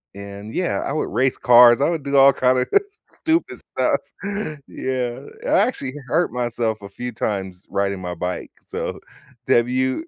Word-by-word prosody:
and, 100 Hz, +2 st, -9 dB
yeah, 180 Hz, -, 0 dB
I 140 Hz, -, -2 dB
would 155 Hz, -, -1 dB
race 130 Hz, 0 st, +1 dB
cars. 120 Hz, 0 st, +7 dB
I 145 Hz, -, +3 dB
would 160 Hz, -4 st, -2 dB
do 140 Hz, 0 st, -2 dB
all 135 Hz, 0 st, +8 dB
kind 130 Hz, 0 st, +2 dB
of 125 Hz, -, -1 dB, 0.4 s
stupid 325 Hz, +1 st, -1 dB, 0.2 s
stuff, -, -, +2 dB, 0.7 s
yeah. 130 Hz, 0 st, -3 dB, 0.2 s
I -, -, -2 dB
actually 200 Hz, -, 0 dB
hurt 175 Hz, +8 st, +1 dB
myself 120 Hz, -3 st, -2 dB
a 100 Hz, -, -8 dB
few 125 Hz, +5 st, -6 dB
times 95 Hz, -4 st, -4 dB
riding 100 Hz, -1 st, -1 dB
my 90 Hz, -1 st, -4 dB
bike. 90 Hz, +2 st, -4 dB, 0.2 s
So, -, -, -4 dB, 0.5 s
have 120 Hz, 0 st, +4 dB
you 130 Hz, -, 0 dB
125 Hz, 165 wpm, -21 LUFS, 100-135 Hz, 0.7 s, all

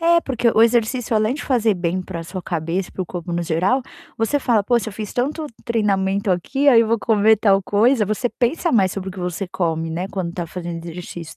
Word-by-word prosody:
É 335 Hz, 0 st, +4 dB
porque 245 Hz, -5 st, 0 dB
o 225 Hz, -, +6 dB
exercício 235 Hz, 0 st, +1 dB
além 215 Hz, +3 st, +1 dB
de 290 Hz, -, -6 dB
fazer 230 Hz, -5 st, +2 dB
bem 180 Hz, +1 st, -2 dB
para 175 Hz, -2 st, -6 dB
sua 180 Hz, +2 st, -7 dB
cabeça, 170 Hz, +2 st, -3 dB
para -, -, -6 dB
o -, -, -8 dB
corpo 175 Hz, -1 st, -6 dB
no 170 Hz, 0 st, -1 dB
geral, 180 Hz, +10 st, +1 dB, 0.4 s
você 225 Hz, +6 st, +1 dB
fala: 235 Hz, -6 st, +2 dB
"Poxa, 235 Hz, +1 st, +1 dB
eu -, -, -12 dB
fiz 210 Hz, +1 st, -6 dB
tanto 300 Hz, +5 st, -1 dB, 0.2 s
treinamento 200 Hz, -3 st, 0 dB
aqui, 270 Hz, +11 st, +1 dB
aí 235 Hz, -4 st, +7 dB
vou 230 Hz, +1 st, +1 dB
comer 220 Hz, 0 st, +4 dB
tal 195 Hz, -2 st, +3 dB
coisa", 220 Hz, +4 st, +3 dB
você 215 Hz, +4 st, -1 dB
pensa 285 Hz, +9 st, 0 dB
mais 195 Hz, -5 st, +3 dB
sobre 195 Hz, -1 st, -5 dB
o -, -, -6 dB
que 190 Hz, -, -11 dB
você 180 Hz, +1 st, -3 dB
come, 165 Hz, -3 st, -2 dB
né, 175 Hz, +3 st, -3 dB
quando 185 Hz, -3 st, -3 dB
está 175 Hz, -1 st, -5 dB
fazendo 170 Hz, -1 st, -6 dB
exercício 170 Hz, -1 st, -8 dB
200 Hz, 220 wpm, -21 LUFS, 180-235 Hz, 0.4 s, aí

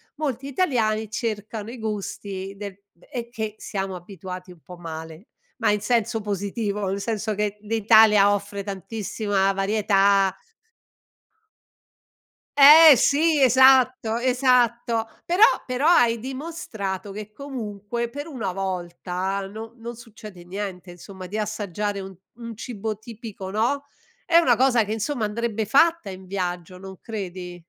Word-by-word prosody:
molti 275 Hz, -3 st, -3 dB
italiani 225 Hz, -, 0 dB
cercano 220 Hz, -1 st, -4 dB
i 250 Hz, -, -9 dB
gusti 200 Hz, -2 st, -5 dB
de 200 Hz, -1 st, -8 dB, 0.3 s
è 240 Hz, -4 st, -5 dB
che 220 Hz, -3 st, -5 dB
siamo 195 Hz, -2 st, -4 dB
abituati 180 Hz, 0 st, -9 dB
un 175 Hz, -, -15 dB
po' 180 Hz, -1 st, -12 dB
male, 160 Hz, +2 st, -9 dB, 0.3 s
ma 225 Hz, -3 st, +2 dB
in 210 Hz, -, +1 dB
senso 230 Hz, 0 st, 0 dB
positivo, 205 Hz, 0 st, -3 dB
nel 195 Hz, +1 st, -2 dB
senso 220 Hz, -1 st, -2 dB
che 210 Hz, 0 st, -2 dB
l'Italia 215 Hz, -1 st, +5 dB
offre 200 Hz, 0 st, -4 dB
tantissima 200 Hz, 0 st, -1 dB
varietà 195 Hz, -1 st, +2 dB, 2.2 s
Eh 300 Hz, +1 st, +10 dB
sì, 305 Hz, 0 st, +3 dB
esatto, 255 Hz, -2 st, +5 dB
esatto, 240 Hz, -2 st, +2 dB, 0.2 s
però 355 Hz, +4 st, 0 dB, 0.2 s
però 255 Hz, +4 st, 0 dB
hai 235 Hz, -9 st, +4 dB
dimostrato 245 Hz, -, -5 dB
che 210 Hz, 0 st, -8 dB
comunque 235 Hz, -3 st, -5 dB
per 290 Hz, +5 st, -7 dB
una 225 Hz, -, -4 dB
volta 185 Hz, 0 st, -3 dB
no 220 Hz, +3 st, -9 dB
non 235 Hz, +1 st, -7 dB
succede 215 Hz, -6 st, -12 dB
niente 185 Hz, -1 st, -6 dB
insomma, 185 Hz, +1 st, -10 dB
di 210 Hz, +4 st, -5 dB
assaggiare 205 Hz, -1 st, -3 dB
un 190 Hz, 0 st, -8 dB, 0.2 s
un 230 Hz, -1 st, -9 dB
cibo 220 Hz, -2 st, -5 dB
tipico, 220 Hz, -4 st, -9 dB
no, 240 Hz, +7 st, 0 dB, 0.4 s
è 335 Hz, -1 st, +4 dB
una 255 Hz, -8 st, +5 dB
cosa 245 Hz, -3 st, +3 dB
che 210 Hz, +1 st, -3 dB
insomma 225 Hz, +1 st, -2 dB
andrebbe 220 Hz, 0 st, -2 dB
fatta 325 Hz, +1 st, +3 dB
in 190 Hz, 0 st, -9 dB
viaggio, 180 Hz, -2 st, -4 dB
non 190 Hz, 0 st, -10 dB
credi? 180 Hz, -5 st, -6 dB
215 Hz, 130 wpm, -24 LUFS, 195-240 Hz, 2.2 s, Eh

